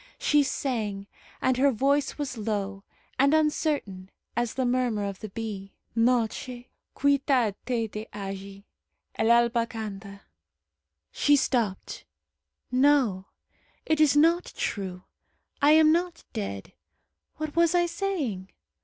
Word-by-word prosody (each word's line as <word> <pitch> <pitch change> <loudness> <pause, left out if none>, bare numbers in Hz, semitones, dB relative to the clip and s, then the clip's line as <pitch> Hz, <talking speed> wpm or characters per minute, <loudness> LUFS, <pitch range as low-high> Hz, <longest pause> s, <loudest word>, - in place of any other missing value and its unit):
She 295 0 +3
sang, 225 -8 -2 0.4
and 260 -1 +2
her 280 +2 +4
voice 275 +4 +1
was 285 -4 -4
low 205 -3 -3 0.4
and 280 +3 +5
uncertain 295 - 0 0.3
as 240 0 -1
the 260 - 0
murmur 245 -4 0
of 200 -1 -5
the 215 - -7
bee, 200 -2 -6 0.2
"Noche, 240 +1 0 0.3
quita 275 -5 +2
te 240 -3 0
de 215 +1 -7
allí. 195 0 -7 0.5
El 225 - 0
alba 235 0 +3
canta...." 200 -3 -7 0.9
She 290 - +3
stopped. 235 - -1 0.7
"No, 255 -8 +3 0.6
it 315 -1 +1
is 295 -2 +5
not 335 +4 +4
true. 185 -3 -3 0.6
I 290 +2 +6
am 310 0 +6
not 345 +1 -1
dead. 100 - -5 0.6
What 310 -1 -5
was 335 0 +3
I 350 0 +4
saying? 335 - -3
240 Hz, 120 wpm, -27 LUFS, 205-290 Hz, 0.9 s, I